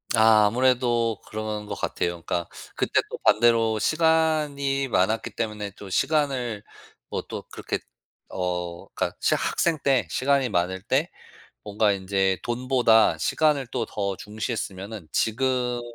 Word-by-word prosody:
아 110 Hz, -1 st, +6 dB
아무래도 120 Hz, -1 st, +2 dB
그런 110 Hz, -1 st, -4 dB
거 105 Hz, -, -5 dB
같아요. 85 Hz, -, -1 dB
그러니까 85 Hz, -1 st, -2 dB, 0.3 s
그때 -, -, +2 dB
또 -, -, -5 dB
반대로 115 Hz, -1 st, +4 dB
시간이 150 Hz, -3 st, +1 dB
많았기 110 Hz, 0 st, +1 dB
때문에 105 Hz, -3 st, -4 dB
또 100 Hz, 0 st, -11 dB
시간을 135 Hz, -5 st, 0 dB, 0.5 s
뭐 -, -, -3 dB
또 -, -, -5 dB
그렇게 -, -, -4 dB, 0.5 s
어 90 Hz, -1 st, -4 dB
그니까 -, -, -2 dB
진짜 -, -, +2 dB
학생 165 Hz, -2 st, +1 dB
때 135 Hz, -2 st, +2 dB
시간이 135 Hz, -1 st, +2 dB
많을 95 Hz, -1 st, -1 dB
때 135 Hz, -, 0 dB, 0.6 s
뭔가 105 Hz, 0 st, +2 dB
인제 95 Hz, -1 st, 0 dB
돈보다 120 Hz, -6 st, +3 dB
시간을 145 Hz, -, +1 dB
또 115 Hz, -, -2 dB
더 100 Hz, -2 st, -2 dB
중시했으면은 105 Hz, -4 st, -5 dB
지금은 125 Hz, -, 0 dB
115 Hz, 280 characters per minute, -25 LUFS, 100-130 Hz, 0.6 s, 아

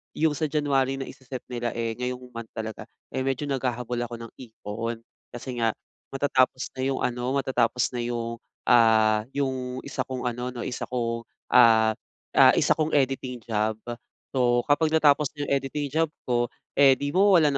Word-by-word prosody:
'yong 160 Hz, 0 st, +2 dB
sa 155 Hz, +2 st, -1 dB
January 140 Hz, -3 st, +1 dB
na 135 Hz, -, -4 dB
isa-set 130 Hz, -1 st, -8 dB
nila, 120 Hz, -1 st, -3 dB
eh, 115 Hz, -1 st, -1 dB
ngayong 125 Hz, 0 st, -3 dB
month 115 Hz, -1 st, -7 dB
talaga, 110 Hz, -1 st, -6 dB, 0.2 s
eh, -, -, -2 dB
medyo 135 Hz, +1 st, -1 dB
naghahabol 125 Hz, -2 st, -2 dB
ako 120 Hz, -, -7 dB
ng 115 Hz, -1 st, -9 dB
ipon. 115 Hz, -1 st, -6 dB, 0.2 s
Kasi 120 Hz, 0 st, -7 dB
nga 115 Hz, -1 st, +1 dB, 0.3 s
matatapos 130 Hz, -2 st, +1 dB
na 130 Hz, -, -5 dB
'yong 135 Hz, -, -1 dB
ano, 125 Hz, +2 st, -1 dB
matatapos 125 Hz, -3 st, +1 dB
na 125 Hz, -, -4 dB
yung, 115 Hz, -1 st, -3 dB, 0.2 s
ah 110 Hz, -2 st, +4 dB
yung 130 Hz, -2 st, -2 dB
isa -, -, -4 dB
kong 130 Hz, -1 st, -4 dB
ano, 125 Hz, +1 st, -3 dB
'no 120 Hz, -, -4 dB
isa 125 Hz, -, -4 dB
kong, 115 Hz, -2 st, -2 dB, 0.2 s
ah 110 Hz, -3 st, +6 dB, 0.4 s
ah, -, -, +7 dB
isa -, -, +2 dB
kong 155 Hz, -1 st, +2 dB
editing 130 Hz, -3 st, 0 dB
job. 110 Hz, -1 st, 0 dB, 0.6 s
So, 120 Hz, -2 st, +2 dB
kapag 160 Hz, +2 st, +4 dB
natapos 150 Hz, -1 st, +4 dB
'yong 145 Hz, -1 st, -4 dB
editing 140 Hz, +1 st, -1 dB
job 160 Hz, +2 st, +2 dB, 0.2 s
ko, 120 Hz, -1 st, +1 dB, 0.3 s
eh, 135 Hz, -1 st, +7 dB
di 145 Hz, +2 st, -3 dB
mawawalan 185 Hz, -5 st, +5 dB
125 Hz, 165 wpm, -26 LUFS, 115-135 Hz, 0.6 s, ah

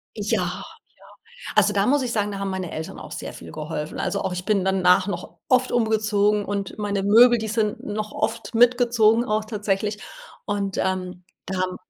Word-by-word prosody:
Ja, -, -, 0 dB
ja. -, -, -4 dB, 0.9 s
Also, 210 Hz, -, +4 dB
da 200 Hz, 0 st, +2 dB
muss 280 Hz, +2 st, +3 dB
ich 245 Hz, -2 st, -2 dB
sagen, 210 Hz, -1 st, 0 dB
da 200 Hz, -, -5 dB
haben 195 Hz, 0 st, -3 dB
meine 190 Hz, -2 st, -4 dB
Eltern 160 Hz, +5 st, -6 dB
auch 150 Hz, -, -10 dB
sehr -, -, -6 dB
viel -, -, -11 dB
geholfen. 155 Hz, 0 st, -5 dB
Also, 200 Hz, -, -1 dB
auch -, -, -2 dB
ich 180 Hz, 0 st, -4 dB
bin 205 Hz, -4 st, +2 dB
danach 185 Hz, -1 st, +3 dB
noch 185 Hz, -3 st, -6 dB
oft 255 Hz, 0 st, +3 dB
umgezogen 210 Hz, -3 st, +2 dB
und 200 Hz, 0 st, -4 dB
meine 205 Hz, -2 st, -1 dB
Möbel, 235 Hz, +5 st, +6 dB
die 220 Hz, -1 st, -4 dB
sind 215 Hz, -1 st, -1 dB
noch 215 Hz, 0 st, -4 dB
oft 230 Hz, +1 st, -3 dB
mitgezogen 235 Hz, -1 st, +4 dB
auch 215 Hz, -2 st, -1 dB
tatsächlich. 210 Hz, -1 st, -2 dB, 0.5 s
Und, 200 Hz, -2 st, -2 dB
ähm, 185 Hz, -1 st, -2 dB, 0.2 s
da 185 Hz, -1 st, -3 dB
haben 185 Hz, 0 st, -1 dB
205 Hz, 185 wpm, -23 LUFS, 190-220 Hz, 0.9 s, Möbel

